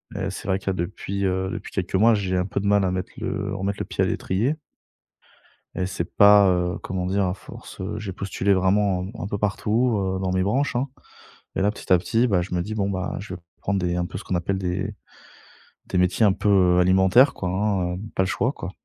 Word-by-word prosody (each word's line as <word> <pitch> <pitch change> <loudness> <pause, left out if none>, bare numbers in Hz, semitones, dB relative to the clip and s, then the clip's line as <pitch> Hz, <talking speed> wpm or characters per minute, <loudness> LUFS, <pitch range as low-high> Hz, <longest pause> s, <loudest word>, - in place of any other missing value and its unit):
Et, 95 -1 -2
c'est - - -8
vrai 95 -1 +2
qu'il 100 - -14
y - - +3
a - - -1
depuis, 95 +2 -3
heu, 95 0 0
depuis - - -6
quelques 95 -2 -3
mois 110 +3 +5
j'ai 95 -2 -1
un 90 - +1
peu 100 - -2
de 100 - -4
mal 100 -1 +4
à 95 - +1
mettre 90 0 -3
le 100 +1 -3
remettre 100 +1 -2
le - - -2
pied - - -1
à - - +1
l'étrier. 115 +11 0 1.2
Et 95 - -1
c'est 90 -2 -3
pas, 100 -1 +7
heu, 90 0 0
comment 90 -1 -3
dire? 95 0 +1
À 90 - -1
force, - - -12
heu, 95 +3 -4
j'ai 100 -3 -5
postulé 100 +1 0
vraiment 95 0 +2
u 95 - -6
un 95 - -4
peu 100 - -3
partout, 110 +3 +1
heu, 95 -1 -1
dans 95 -1 -1
mes 95 0 +1
branches, 125 +6 0
hein. 130 +3 0 0.7
Et - - 0
là 100 +2 +3
petit - - -10
à 90 - +8
petit, 115 +7 +1
bah, 95 -6 +2
je 90 - -5
me 90 - +1
dis 110 +4 -5
bon, 100 -2 0
bah, 95 -2 -3
je 100 -2 -7
vais - - -10 0.2
prendre 100 -1 0
des 90 -1 -1
un 90 - 0
peu 95 - -6
ce - - -8
qu'on 95 - -2
appelle 90 +3 -1
des 95 +1 -2 0.9
des 90 - -1
métiers 90 +5 +3
un 100 - +5
peu, 105 - -2
heu, 90 -3 +4
alimentaires 95 +8 +5
quoi, 90 - -3
hein, 95 -2 0
heu, - - -7
pas - - +2
le 95 - +1
choix 120 +6 0
quoi. 95 - -7
95 Hz, 250 wpm, -24 LUFS, 90-100 Hz, 1.2 s, à